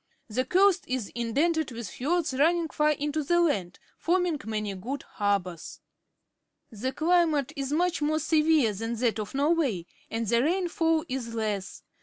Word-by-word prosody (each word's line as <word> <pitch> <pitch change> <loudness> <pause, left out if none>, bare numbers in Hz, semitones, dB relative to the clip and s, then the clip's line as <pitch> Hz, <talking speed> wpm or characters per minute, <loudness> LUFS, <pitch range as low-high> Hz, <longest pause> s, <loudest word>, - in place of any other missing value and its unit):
The 255 +4 -1
coast 385 +3 +3
is 255 -5 -3
indented 290 +7 0
with 235 -2 -6
fiords 310 - -1
running 325 +4 +2
far 300 0 +2
into 295 +1 -1
the 345 +5 +2
land, 200 - 0 0.2
forming 350 -3 +1
many 215 -2 -2
good 250 +9 -5
harbours. 195 -5 -2 0.9
The 235 +4 -3
climate 310 -2 +2
is 275 -1 -3
much 345 +2 +1
more 310 +1 +1
severe 310 -6 +3
than 225 +4 -3
that 230 -1 0
of 210 +4 -5
Norway, 280 - +1 0.2
and 230 0 -2
the 235 +2 +2
rainfall 325 0 +1
is 250 -4 -4
less. 210 -4 -3
280 Hz, 150 wpm, -27 LUFS, 225-325 Hz, 0.9 s, coast